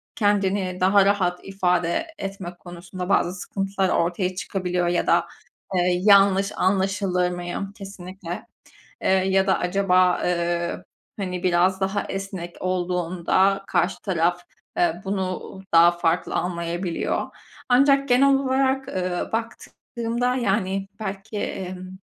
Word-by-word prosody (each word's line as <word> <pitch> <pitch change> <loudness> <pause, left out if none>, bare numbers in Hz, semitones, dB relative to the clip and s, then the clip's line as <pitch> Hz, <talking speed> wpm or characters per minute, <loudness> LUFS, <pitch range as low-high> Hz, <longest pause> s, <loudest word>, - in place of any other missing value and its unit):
Kendini 195 -3 +1
daha 195 +1 +5
rahat 185 -3 +1
ifade 180 - 0
etmek 190 -3 -6
konusunda 180 +1 -8
bazı 180 -2 +2
sıkıntılar 195 0 -2
ortaya 180 +2 0
çıkabiliyor 180 -1 -2
ya 175 0 0
da, - - +3 0.5
eee, 180 0 +2
"Yanlış 200 -1 +5
anlaşılır 190 -1 +1
mıyım?" 175 +3 -5
kesinlikle, 185 -3 -8 0.6
eee, - - 0
ya 190 0 +3
da 190 - +2
"Acaba, 180 0 +2
eee, 170 -1 -1 0.3
hani 180 -3 -4
biraz 185 +2 +2
daha 195 +1 0
esnek 190 -3 -5
olduğunda 185 +2 +1
karşı 175 +3 +1
taraf, 175 -2 +1 0.4
eee, 175 0 +1
bunu 190 -1 -3
daha 170 +1 +7
farklı 170 -1 -1
anlayabiliyor." 170 0 -2 0.4
Ancak 275 +2 +4
genel 275 +3 +5
olarak, 265 0 +1
ııı, 180 -3 -2
baktığımda 235 +1 -3
yani 195 -4 0
belki, 200 +1 -5
emm, 185 -2 -5
185 Hz, 115 wpm, -23 LUFS, 180-200 Hz, 0.6 s, daha